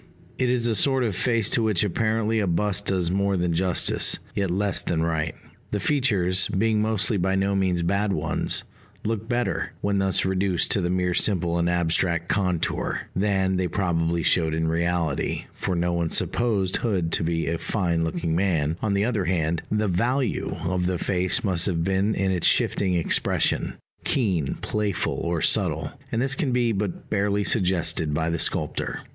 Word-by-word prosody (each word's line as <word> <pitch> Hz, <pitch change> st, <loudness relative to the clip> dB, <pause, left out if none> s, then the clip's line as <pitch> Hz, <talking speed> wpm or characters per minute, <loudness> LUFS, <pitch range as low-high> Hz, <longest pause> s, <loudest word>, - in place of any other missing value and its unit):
It 130 Hz, -1 st, +2 dB
is 125 Hz, -1 st, +1 dB
a 115 Hz, -, +1 dB
sort 135 Hz, +3 st, +3 dB
of 110 Hz, -6 st, -1 dB
face 115 Hz, +1 st, +1 dB
to 120 Hz, -, +3 dB
which 110 Hz, -5 st, +2 dB
apparently 110 Hz, +2 st, 0 dB
a 100 Hz, -, 0 dB
bust 105 Hz, +4 st, 0 dB
does 90 Hz, -3 st, 0 dB
more 100 Hz, 0 st, +1 dB
than 85 Hz, -1 st, 0 dB
justice, 90 Hz, +1 st, +2 dB, 0.2 s
yet 100 Hz, -2 st, -1 dB
less 95 Hz, +1 st, +1 dB
than 80 Hz, -1 st, -1 dB
right. 80 Hz, -2 st, -1 dB, 0.3 s
The 105 Hz, -, -2 dB
features, 95 Hz, -8 st, +2 dB
being 110 Hz, +2 st, +1 dB
mostly 110 Hz, 0 st, +1 dB
by 95 Hz, +1 st, 0 dB
no 95 Hz, +1 st, +1 dB
means 90 Hz, -3 st, +1 dB
bad 100 Hz, +4 st, 0 dB
ones, -, -, -1 dB, 0.4 s
look 110 Hz, 0 st, -3 dB
better, 120 Hz, 0 st, -1 dB
when 100 Hz, -1 st, 0 dB
thus 95 Hz, -1 st, +1 dB
reduced 95 Hz, -1 st, 0 dB
to 100 Hz, -, +3 dB
the 90 Hz, -, -1 dB
mere 90 Hz, 0 st, 0 dB
simple 85 Hz, -3 st, +2 dB
and 85 Hz, 0 st, +1 dB
abstract 85 Hz, 0 st, 0 dB
contour, 90 Hz, -4 st, -1 dB
than 95 Hz, -1 st, +1 dB
they 90 Hz, -1 st, 0 dB
probably 85 Hz, -2 st, 0 dB
showed 80 Hz, -2 st, +2 dB
in 80 Hz, 0 st, 0 dB
reality, 85 Hz, -2 st, -1 dB
for 95 Hz, -, -3 dB
no 85 Hz, 0 st, 0 dB
one 85 Hz, -1 st, 0 dB
supposed 100 Hz, -4 st, +1 dB
Hood 95 Hz, -8 st, -1 dB
to -, -, +1 dB
be 80 Hz, 0 st, -1 dB
a 85 Hz, 0 st, -2 dB
fine 85 Hz, -5 st, -1 dB
looking 80 Hz, 0 st, -2 dB
man; 85 Hz, -4 st, 0 dB
on 105 Hz, -2 st, 0 dB
the 100 Hz, +1 st, +2 dB
other 110 Hz, -6 st, -1 dB
hand, 85 Hz, -2 st, 0 dB
the 105 Hz, 0 st, 0 dB
value 120 Hz, +8 st, 0 dB
of 90 Hz, +1 st, 0 dB
the 90 Hz, -1 st, 0 dB
face 95 Hz, +8 st, 0 dB
must 95 Hz, -4 st, +1 dB
have 85 Hz, -4 st, 0 dB
been 95 Hz, +3 st, +1 dB
in 95 Hz, 0 st, 0 dB
its 90 Hz, -3 st, +2 dB
shifting 95 Hz, -2 st, +1 dB
expression 85 Hz, -, +1 dB, 0.3 s
keen, 95 Hz, -, 0 dB
playful, 105 Hz, -4 st, -1 dB
or 85 Hz, -2 st, -2 dB
subtle -, -, +1 dB, 0.2 s
and 115 Hz, -, 0 dB
this 135 Hz, 0 st, 0 dB
can 140 Hz, -1 st, -1 dB
be 120 Hz, -1 st, +2 dB
but 100 Hz, -3 st, -4 dB
barely 100 Hz, 0 st, +1 dB
suggested 85 Hz, -7 st, +1 dB
by 80 Hz, +2 st, 0 dB
the 85 Hz, -, -2 dB
sculptor. -, -, -1 dB
95 Hz, 180 wpm, -24 LUFS, 85-105 Hz, 0.4 s, sort